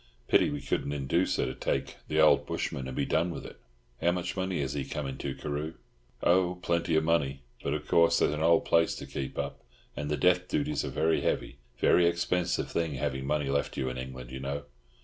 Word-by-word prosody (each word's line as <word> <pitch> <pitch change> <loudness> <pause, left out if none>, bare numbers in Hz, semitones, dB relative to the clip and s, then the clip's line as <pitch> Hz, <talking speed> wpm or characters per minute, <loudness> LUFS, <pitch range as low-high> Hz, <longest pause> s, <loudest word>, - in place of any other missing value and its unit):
Pity - - +4
we - - -4
couldn't 70 - -1
induce 85 +6 +1
her - - +1
to 65 - -3
take 65 - -2
the 80 - 0
old 80 - +5
bushman 65 -1 -3
and 65 - -6
be - - +1
done 85 +3 +1
with 85 - -6
it. - - -11 0.4
How 85 - +4
much 90 -1 -3
money 95 -1 -1
has 70 0 -2
he 70 -2 -2
come 75 - -4
into, 65 0 -4
Carew?" 75 +2 -4 0.5
"Oh, 90 0 +3
plenty 85 -1 +1
of 80 - +3
money. 70 -5 +1 0.2
But 70 - -1
of 75 0 -5
course 85 0 +5
there's - - +2
an 75 - -3
old 85 +1 +4
place 85 -1 +3
to - - -7
keep 65 -1 -5
up, - - -3 0.3
and 75 0 -3
the 75 - 0
death 90 +4 +3
duties 150 0 0
are - - -3
very 80 +1 +1
heavy. - - -1 0.2
Very 85 +6 +5
expensive 85 0 0
thing 80 -4 -1
having 65 0 -2
money 75 -1 0
left 70 +1 -1
you 65 -2 0
in 65 0 -5
England, 65 -1 -7
you 65 - -5
know." 70 +2 -3
75 Hz, 220 wpm, -29 LUFS, 70-85 Hz, 0.5 s, old